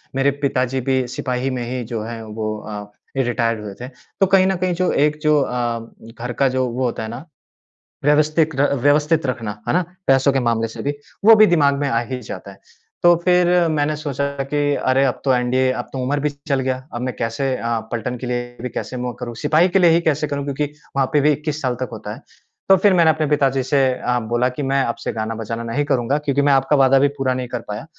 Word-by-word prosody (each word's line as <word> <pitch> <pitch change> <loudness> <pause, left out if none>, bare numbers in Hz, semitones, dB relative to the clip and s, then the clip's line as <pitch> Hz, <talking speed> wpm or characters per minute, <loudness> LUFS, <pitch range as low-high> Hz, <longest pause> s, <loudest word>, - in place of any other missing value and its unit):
मेरे 135 +1 +3
पिताजी 130 -2 0
भी 130 -1 +2
सिपाही 125 +1 -2
में - - -3
ही 125 -1 -3
जो 110 - -2
है 115 0 -6
वो 110 0 -4
अ, 105 -1 -8 0.3
रिटायर्ड 115 -3 0
हुए 100 -2 -7
थे। 125 - -5
तो 140 +8 -3
कहीं 190 -1 +6
न 190 - +1
कहीं 180 0 0
जो 180 +1 0
एक 150 0 -1
जो 150 -1 +4
अ, 120 -3 -1 0.4
घर 120 +1 -4
का 135 - +4
जो 130 -1 +1
वो 125 +2 -3
होता 115 -2 -2
है 110 - -5
ना, 120 +6 -8 0.8
व्यवस्थित 155 +1 +2
र 140 +1 +2
व्यवस्थित 150 +2 +3
रखना, 120 -5 -2 0.2
है - - +1
ना, 180 0 +2 0.2
पैसों 135 +1 +4
के 135 - +2
मामले 115 -2 0
से 115 - -8
भी, 145 - 0 0.3
वो 225 0 +9
भी 215 0 +7
दिमाग 145 -5 +3
में 145 - 0
आ 115 -3 +1
ही 130 -1 -3
जाता 100 -2 -8
है। 100 - -17 0.4
तो 175 0 +7
फिर 180 -1 +4 0.2
मैंने 150 0 0
सोचा 140 -2 -3 0.3
कि 145 - +1 0.2
अरे 130 0 +2
अब 125 - -1
तो, 135 - +4
एनडीए 130 +1 +2
अब - - -5
तो - - -4
उम्र 145 +3 0
भी 150 - 0 0.2
चल 140 -2 +1
गया, 130 0 -1 0.2
अब 120 - -4
मैं 130 0 -2
कैसे 125 +4 -1
अ, 115 0 -1
पलटन 120 +2 -3
के 125 - -6
लिए 120 0 -4
भी 125 - -4
कैसे 125 +3 -5
मौक 125 0 -5
करूँ, 120 -1 -6
सिपाही 160 +5 +4
के 190 - +2
लिए 175 -2 +6
ही 165 +1 +3
कैसे 150 +1 0
करूँ, 140 -1 -3
क्योंकि 145 +1 -1 0.3
वहाँ 135 -1 +2
पे 150 - +4
भी 150 +1 +4
21 150 +1 -3
साल 125 -2 -1
तक 130 -3 -3
होता - - -7
है। - - -11 0.5
तो 195 - +8
फिर 200 -2 +6
मैंने 170 -3 +5
अपने 155 0 +2
पिताजी 135 -3 +2
से 140 +2 +1
अ, 125 -1 -1
बोला 120 +2 +2
कि 135 +3 -5
मैं 135 -1 +2
अब 120 - -2
से - - -2
गाना-बजाना 115 +1 -4
नहीं 115 +6 -1
करूँगा, 135 0 +1
क्योंकि 145 -1 0
मैं 140 0 +4
आपका 135 +2 +3
वादा 135 +1 +5
भी 145 - +4
पूरा 130 -1 0
नहीं 125 -1 -4
कर 120 0 -4
पाया। 105 +7 -5
130 Hz, 240 wpm, -20 LUFS, 120-150 Hz, 0.8 s, वो